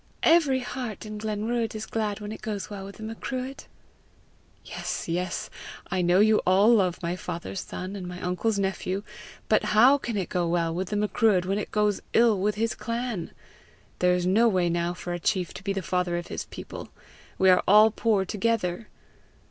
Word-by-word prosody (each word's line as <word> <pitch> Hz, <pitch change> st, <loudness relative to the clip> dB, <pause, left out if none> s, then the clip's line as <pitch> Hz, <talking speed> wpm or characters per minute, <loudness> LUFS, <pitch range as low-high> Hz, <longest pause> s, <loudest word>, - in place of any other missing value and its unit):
"Every 295 Hz, -6 st, +4 dB
heart 245 Hz, -5 st, -5 dB
in 215 Hz, 0 st, -6 dB
Glenruadh 220 Hz, +2 st, -2 dB
is 215 Hz, -, -4 dB
glad 215 Hz, -2 st, -2 dB
when 210 Hz, 0 st, -6 dB
it 220 Hz, -, -8 dB
goes 210 Hz, -2 st, -4 dB
well 195 Hz, -1 st, -6 dB
with 200 Hz, -, -10 dB
the 220 Hz, -, -9 dB
Macruadh." 255 Hz, +4 st, -5 dB, 1.0 s
"Yes, -, -, -4 dB
yes; 175 Hz, +2 st, -2 dB, 0.4 s
I 185 Hz, 0 st, +1 dB
know 175 Hz, +1 st, +4 dB
you 215 Hz, +1 st, +5 dB
all 195 Hz, +5 st, +4 dB
love 185 Hz, -5 st, +2 dB
my 170 Hz, +1 st, -1 dB
father's 180 Hz, +1 st, -5 dB
son 185 Hz, +2 st, -6 dB
and 185 Hz, -3 st, -6 dB
my 180 Hz, 0 st, -7 dB
uncle's 185 Hz, +5 st, -1 dB
nephew; 195 Hz, 0 st, -2 dB, 0.4 s
but -, -, +3 dB
how 250 Hz, +7 st, +5 dB
can 235 Hz, -5 st, -3 dB
it 190 Hz, -, -1 dB
go 175 Hz, -2 st, 0 dB
well 170 Hz, -1 st, 0 dB
with 180 Hz, +2 st, -3 dB
the 210 Hz, -, -2 dB
Macruadh 210 Hz, -3 st, +2 dB
when 195 Hz, +2 st, 0 dB
it -, -, -5 dB
goes 210 Hz, -1 st, +1 dB
ill 230 Hz, -4 st, +4 dB
with 205 Hz, +2 st, 0 dB
his 225 Hz, +2 st, 0 dB
clan? 230 Hz, -6 st, -3 dB, 0.7 s
There 180 Hz, 0 st, +4 dB
is 180 Hz, 0 st, -1 dB
no 215 Hz, +6 st, +4 dB
way 180 Hz, -5 st, +2 dB
now 170 Hz, +1 st, -1 dB
for 175 Hz, 0 st, -5 dB
a 175 Hz, -, -3 dB
chief 180 Hz, 0 st, 0 dB
to -, -, -9 dB
be 200 Hz, -, -1 dB
the 195 Hz, -1 st, -2 dB
father 180 Hz, +1 st, 0 dB
of 175 Hz, -, -6 dB
his -, -, -4 dB
people; -, -, -9 dB, 0.5 s
we 190 Hz, 0 st, +5 dB
are 180 Hz, -, +5 dB
all 215 Hz, +3 st, +7 dB
poor 210 Hz, -3 st, +1 dB
together! 210 Hz, -1 st, -1 dB
200 Hz, 195 wpm, -26 LUFS, 180-220 Hz, 1.0 s, all